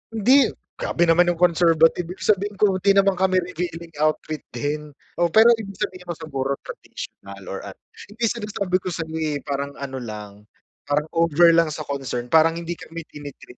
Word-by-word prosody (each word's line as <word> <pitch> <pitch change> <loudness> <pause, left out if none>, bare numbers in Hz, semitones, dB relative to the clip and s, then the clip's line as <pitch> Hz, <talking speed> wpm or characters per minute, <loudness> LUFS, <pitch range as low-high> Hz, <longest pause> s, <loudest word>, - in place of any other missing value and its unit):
hindi! 255 +6 +5 0.3
Grabe 170 - 0
naman 175 +1 +4
yung 175 - +2
conservative, 165 -1 +4
ibig 180 +2 -8
sabihin 205 0 +1
ko 205 0 +3
hindi 200 +2 +4
naman 195 -2 +3
kami 190 0 +3
revealing 170 -1 -5
outfit 155 0 0 0.2
din. 150 0 -4 0.2
Oo, 175 - +4
pero 220 +7 +6
ibig 200 -2 -7
sabihin 185 -2 -5
mo 170 - -3
siguro 140 -4 -3
traditional 100 0 -9
or 95 - -4
ano, 95 - -9 0.3
yun 210 - -15
din 230 -2 +2
sinasabi 200 -5 -3
ko 185 - -8
sayo 160 -1 -5
eh, 150 -3 -2
parang 140 0 -4
ano 135 -1 -6
lang, 105 -4 -7 0.6
parang 145 +1 +1
over 170 0 +5
lang 165 0 +4
sa 155 0 -5
concern, 130 -4 -4
parang 165 +1 +5
hindi 170 0 -4
kami 165 +1 -8
tini-treat 145 -4 -11
165 Hz, 180 wpm, -23 LUFS, 145-185 Hz, 0.6 s, pero